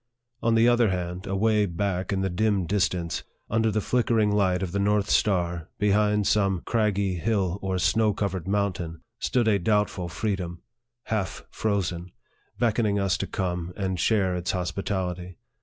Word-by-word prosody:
On 115 0 +2
the 115 +1 +5
other 120 -2 +4
hand, 90 +1 -3
away 105 +2 +2
back 90 +1 -2
in 95 -1 0
the 95 - 0
dim 100 0 +1
distance, 90 -3 0 0.3
under 110 +1 +2
the 110 0 0
flickering 115 -2 +2
light 95 -2 +2
of 90 - -3
the 100 - -1
north 105 0 +1
star, 85 -4 +1
behind 105 0 +2
some 95 -3 +2
craggy 100 -5 +1
hill 100 -2 0
or 95 -1 -1
snow 110 +4 +3
covered 95 -4 -3
mountain, 95 -5 -1 0.2
stood 120 -3 +1
a 105 -2 +3
doubtful 100 -2 0
free 100 +4 -1
dom 85 -2 -6 0.4
half 105 -4 -3
frozen 90 -4 -1 0.5
beckoning 110 -3 +1
us 100 -2 +1
to - - -2
come 90 -1 -3
and 95 -3 -2
share 95 -4 +2
its 90 0 -3
hospitality. 90 0 -3
100 Hz, 155 wpm, -26 LUFS, 90-105 Hz, 0.5 s, the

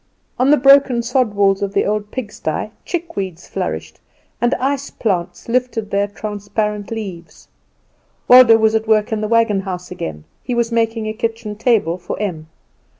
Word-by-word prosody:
On 255 +2 +3
the 295 - +6
broken 275 -3 +5
sod 240 -3 0
walls 195 -1 +3
of 200 -1 -2
the - - +2
old 210 0 -1
pigsty 235 -4 -4
chick 340 -1 -4
weeds 185 -4 -5
flourished, 80 -1 -4 0.4
and 240 +2 +2
ice 280 +1 -2
plants 180 -5 -3
lifted 235 -3 -1
heir 200 0 +2
transparent 205 0 -4
leaves. 195 -7 -7 0.8
Waldo 245 -2 +8
was 220 0 +2
at 220 0 0
work 215 -1 +2
in 220 -1 -1
the 215 - -1
wagon 225 -3 +2
house 180 -2 -6
again. 80 - -6 0.2
He 245 - -3
was 235 -1 0
making 225 -1 0
a 215 - -3
kitchen 225 -1 -4
table 210 -6 +1
for 175 - -6
Em. 170 -7 -4
215 Hz, 165 wpm, -18 LUFS, 195-235 Hz, 0.8 s, Waldo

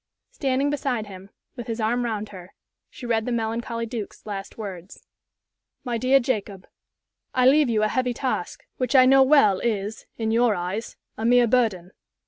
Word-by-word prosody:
Standing 275 - 0
beside 260 -6 -2
him, 195 -1 -11 0.3
with 240 -3 -7
his 230 0 -4
arm 240 +3 0
round 215 -2 -3
her, 185 -2 -12 0.3
she 250 - -11
read 225 -1 0
the - - -1
melancholy 230 0 -2
Duke's 225 -3 -7
last 200 -2 -7
words: 195 -4 -9 0.8
"My 240 -3 -2
Dear 260 +3 +4
Jacob, 210 -7 -3 0.7
I 255 -1 +3
leave 280 +1 +5
you 215 -2 +1
a - - +3
heavy 250 +2 -1
task, 260 +1 -3
which 255 +2 -1
I 255 -1 +8
know 270 +1 +6
well 260 -9 +5
is, 215 -1 -3
in 220 -1 -1
your 230 -1 +3
eyes, 185 +6 -5 0.2
a - - -3
mere 245 +1 +5
burden. 215 -7 0
230 Hz, 170 wpm, -24 LUFS, 210-255 Hz, 0.8 s, I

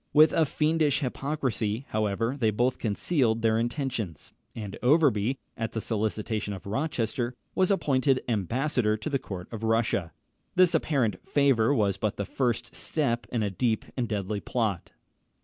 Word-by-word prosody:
With 155 +1 +7
a 165 -2 +4
fiendish 155 0 +1
hypocrisy, 130 -4 -2
however, 110 +4 0
they 120 -6 +2
both 120 +4 +1
concealed 115 - +1
their 110 0 +3
intentions; 120 - -3 0.2
and 105 -4 -6
Overbury, 130 -4 +3 0.2
at 115 -1 -3
the 110 - -1
solicitation 110 -1 -2
of 95 - -11
Rochester, 120 +1 -2 0.2
was 185 -1 +2
appointed 135 -8 +2
ambassador 115 - 0
to 110 - -4
the 135 - +1
court 95 -8 -7
of 110 - -5
Russia. 110 -6 +1 0.4
This 180 -1 +5
apparent 135 - +1
favour 135 -5 +3
was 100 -8 +2
but 105 +1 -2
the 100 - -2
first 120 -1 -1
step 120 -7 -1
in 115 -3 0
a 100 - -1
deep 110 +2 0
and 120 -3 -2
deadly 105 -1 -2
plot. 105 -6 -2
115 Hz, 150 wpm, -27 LUFS, 105-135 Hz, 0.4 s, With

